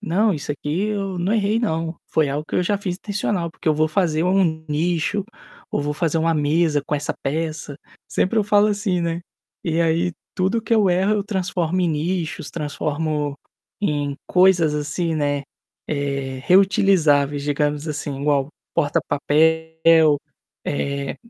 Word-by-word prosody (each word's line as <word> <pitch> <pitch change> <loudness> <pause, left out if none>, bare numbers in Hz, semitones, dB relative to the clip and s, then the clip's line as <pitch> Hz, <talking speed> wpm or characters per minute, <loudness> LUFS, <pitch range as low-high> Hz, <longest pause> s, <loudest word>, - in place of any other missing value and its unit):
"Não, 210 +2 +2
isso 145 -1 -3
aqui 150 +7 -2
eu 195 -3 -2
não 185 +5 0
errei 215 0 +2
não, 165 -6 -1
foi 155 -3 +1
algo 145 +2 -2
que - - -5
eu 180 - +3
já 200 +3 0
fiz 185 -3 -3
intencional 200 -4 -2
porque 165 - -4
eu 155 - +4
vou 155 +1 +2
fazer 160 -2 +1
um 175 -4 +1
nicho, 170 +5 0 0.5
ou - - 0
vou 145 +1 -1
fazer 165 +1 0
uma 165 0 +2
mesa 150 0 +2
com 150 - -1
essa 145 - -1
peça", 155 0 -3 0.3
sempre 220 +4 +1
eu 210 - +2
falo 205 0 +4
assim, 205 -3 0
né. 170 0 -1 0.4
E 165 0 0
aí 170 +2 +1 0.2
tudo 205 +4 +1
que 230 - -3
eu 210 -4 +4
erro 190 +4 +2
eu 205 -1 -1
transformo 185 -3 -1
em 175 - +2
nichos, 165 +2 -2
transformo 150 -1 -2 0.5
em 145 -6 -1
coisas, 180 -4 +4
assim, 160 +3 -1
né, 145 -1 0 0.5
eh, 140 -2 -2
reutilizáveis 175 -7 +4
digamos, 145 +1 -1
assim, 145 -2 -4
igual 140 -1 +1 0.3
porta-papel 160 +1 +3 0.5
eh 140 -1 -2
160 Hz, 155 wpm, -22 LUFS, 150-185 Hz, 0.5 s, eu